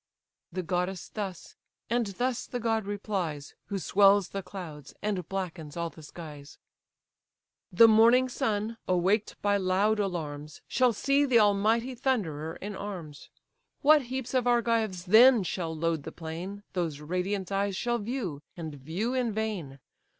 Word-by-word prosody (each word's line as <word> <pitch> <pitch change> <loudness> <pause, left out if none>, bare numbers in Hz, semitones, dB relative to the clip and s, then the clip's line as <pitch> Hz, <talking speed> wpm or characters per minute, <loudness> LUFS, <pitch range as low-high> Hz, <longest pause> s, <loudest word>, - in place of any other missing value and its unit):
The 185 +1 -3
goddess 180 +2 -2
thus; 195 -5 -6 0.3
and 235 -1 +1
thus 245 +5 -2
the 245 - -4
god 225 -2 0
replies, 190 -8 -3
Who 200 - -2
swells 195 0 +4
the 195 - -4
clouds, 170 -7 -9
and 195 -5 -2
blackens 175 -5 -5
all 170 -1 -2
the 160 - -14
skies: 150 -2 -10 1.1
"The 230 +6 +8
morning 230 +4 +6
sun, 220 -2 -2
awaked 185 +4 +1
by 205 0 +3
loud 200 +3 +2
alarms, 155 -6 -4
Shall 255 -1 +3
see 275 +6 +2
the 260 -4 +4
almighty 220 +4 +3
Thunderer 175 - -1
in 205 +1 -6
arms. 175 -8 -7 0.5
What 295 -1 +6
heaps 260 0 -4
of 250 -2 +2
Argives 230 -6 +1
then 230 +3 +7
shall 170 -2 -3
load 165 -1 0
the 160 - -7
plain, 175 +6 -7
Those 165 -6 -2
radiant 185 +5 -2
eyes 200 0 0
shall 240 +4 0
view, 205 - -4 0.2
and 160 -3 -5
view 165 - -3
in 250 -3 0
vain. 205 -11 -3
195 Hz, 145 wpm, -29 LUFS, 170-225 Hz, 1.1 s, The